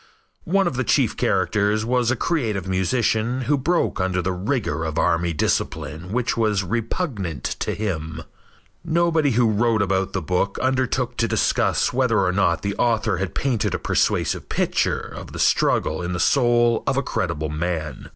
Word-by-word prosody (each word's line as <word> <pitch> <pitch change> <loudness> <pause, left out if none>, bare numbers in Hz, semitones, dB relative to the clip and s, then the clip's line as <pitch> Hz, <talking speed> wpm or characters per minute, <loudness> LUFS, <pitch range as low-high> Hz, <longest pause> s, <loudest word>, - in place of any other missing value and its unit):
One 195 +2 +3
of 155 -8 -2
the 130 - +1
chief - - +2
characters 105 +4 +1
was 125 0 +1
a 130 - +2
creative 110 - -1
musician 110 +6 0
who 135 +4 +1
broke 145 - 0
under 95 0 0
the 90 +1 -1
rigor 90 - -2
of 80 -1 -3
army 85 0 +1
discipline 80 +2 -2
which 125 +2 0
was 105 -4 +1
repugnant 105 - -3 0.2
to - - -2
him. 80 -6 -4 0.6
Nobody 165 -2 +2
who 120 0 +3
wrote 110 0 +2
about 95 0 -1
the 95 - -1
book 90 +4 -1
undertook 130 -1 0
to 115 - +1
discuss - - +1
whether - - +2
or 90 - +2
not 100 +2 +1
the 100 0 -2
author 110 -4 +1
had 95 -2 -4
painted 125 -6 0
a - - 0
persuasive - - 0
picture - - 0
of - - -9
the - - -6
struggle - - +2
in 90 +1 -3
the 90 - -3
soul 120 - +3
of 135 - +1
a 140 - +1
credible 80 -9 -2
man. 80 0 -4
105 Hz, 170 wpm, -22 LUFS, 90-125 Hz, 0.6 s, One